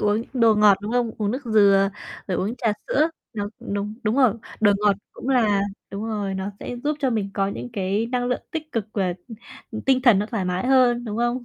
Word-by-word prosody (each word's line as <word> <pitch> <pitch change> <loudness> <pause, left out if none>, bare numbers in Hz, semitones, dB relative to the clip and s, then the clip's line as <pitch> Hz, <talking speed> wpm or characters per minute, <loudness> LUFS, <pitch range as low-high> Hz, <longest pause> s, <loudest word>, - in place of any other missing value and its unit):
uống 210 +2 +1
đồ 230 -4 +4
ngọt, 210 -2 +5
đúng 215 - -4
không? 245 -2 +1
Uống 210 -2 0
nước 260 +4 -4
dừa, 200 -3 +4 0.4
rồi 185 - 0
uống 215 +6 -2
trà 230 -3 +1
sữa, 310 +3 +2 0.2
nó 205 -3 -3
đúng, 205 +1 -4
đúng 220 +2 0
rồi, 255 -6 +4 0.3
đồ 205 -2 +5
ngọt 205 -2 +3 0.2
cũng 265 - -7
là 220 -6 +3 0.3
đúng 200 +2 -5
rồi, 205 -3 -2
nó 190 +1 -3
sẽ 245 - -5
giúp 300 0 0
cho 265 -4 +1
mình 205 -4 -1
có 195 -1 +1
những 200 - -6
cái 200 +1 -1
năng 245 +1 -1
lượng 250 - -1
tích 315 -2 -5
cực 225 -3 -1
và, 190 -3 0 0.6
ừ, - - -5
tinh 260 -1 +3
thần 240 -6 +6
nó 210 - -1
thoải 220 -5 -3
mái 180 +4 -1
hơn, 250 -2 +4
đúng 215 -2 -4
không? 240 +1 0
220 Hz, 230 wpm, -23 LUFS, 200-245 Hz, 0.6 s, thần